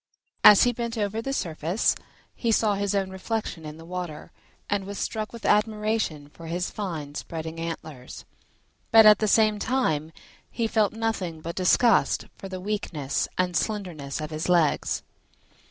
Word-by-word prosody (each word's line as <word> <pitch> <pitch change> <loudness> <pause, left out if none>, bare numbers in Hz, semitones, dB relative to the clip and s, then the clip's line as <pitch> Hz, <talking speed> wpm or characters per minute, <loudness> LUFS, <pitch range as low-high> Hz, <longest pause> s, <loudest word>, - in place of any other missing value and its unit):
As 210 - +9
he 245 - +3
bent 235 0 -4
over 215 +1 -1
the 270 - -3
surface 175 - 0 0.4
he 230 - 0
saw 215 -1 +3
his 200 0 -1
own 195 -1 0
reflection 190 -4 -4
in 150 +1 -8
the 165 - -12
water, 175 -3 -6 0.4
and 200 -1 -1
was 200 0 -6
struck 215 +2 -3
with 235 -2 -9
admiration 210 -8 +1
for 165 +2 -12
his 175 +2 -2
fine 160 -8 -5
spreading 160 +1 -6
antlers, 155 -6 -7 0.6
but 225 -1 +8
at 210 0 +8
the 215 - +1
same 215 0 +4
time 160 - 0 0.4
he 230 - -2
felt 220 -2 +2
nothing 220 -7 -2
but 165 +2 -5
disgust 205 +5 +3
for 195 - -9
the 185 -1 -5
weakness 180 -8 -2
and 180 -1 0
slenderness 165 -8 -2
of 155 0 -5
his 155 +3 -3
legs. 170 -4 +2
190 Hz, 160 wpm, -26 LUFS, 160-215 Hz, 0.6 s, As